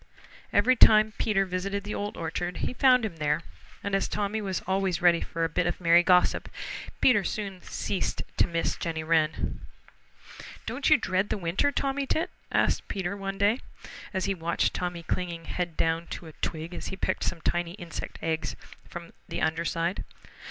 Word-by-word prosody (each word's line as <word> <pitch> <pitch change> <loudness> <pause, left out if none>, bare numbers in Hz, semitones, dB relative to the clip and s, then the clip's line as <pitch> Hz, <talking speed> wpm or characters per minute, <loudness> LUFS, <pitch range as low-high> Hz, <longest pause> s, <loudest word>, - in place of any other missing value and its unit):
Every 240 +6 +4
time 215 -2 +7
Peter 195 -3 +2
visited 195 +2 -2
the 205 - -4
Old 205 0 -4
Orchard 175 +2 -3
he - - -2
found 255 -2 +5
him 180 -7 -5
there, 150 +1 +1 0.4
and 200 - -3
as 195 - +2
Tommy 210 +1 -1
was 190 -3 -2
always 190 -1 +1
ready 175 -1 +5
for 165 - -3
a - - +3
bit 170 +2 0
of 175 - -2
merry 170 -1 +6
gossip, 180 0 +3 0.5
Peter 235 -6 +5
soon 195 -4 -4
ceased 195 - -2
to - - +4
miss 165 -1 0
Jenny 160 -1 -3
Wren. 155 -1 +1 1.1
"Don't - - 0
you - - +8
dread 185 +2 0
the - - 0
winter, 190 +10 +1
Tommy 275 0 -1
Tit?" 330 +6 0 0.2
asked - - +2
Peter 195 -1 -2
one 195 -1 -4
day, 205 +5 +3 0.5
as 190 -2 -1
he 195 - +1
watched 170 -2 0
Tommy 175 -1 -3
clinging 170 -1 -3
head 175 -1 -3
down 165 +1 +1
to - - -7
a 160 - -9
twig 160 +2 -4
as - - -5
he 190 - -4
picked 185 - -1
some 170 - -1
tiny 175 +1 -1
insect 175 -3 -7
eggs 160 0 -1 0.3
from 170 -1 -8 0.2
the - - -3
under 160 +1 +1
side. 170 +2 -1
180 Hz, 180 wpm, -28 LUFS, 165-200 Hz, 1.1 s, you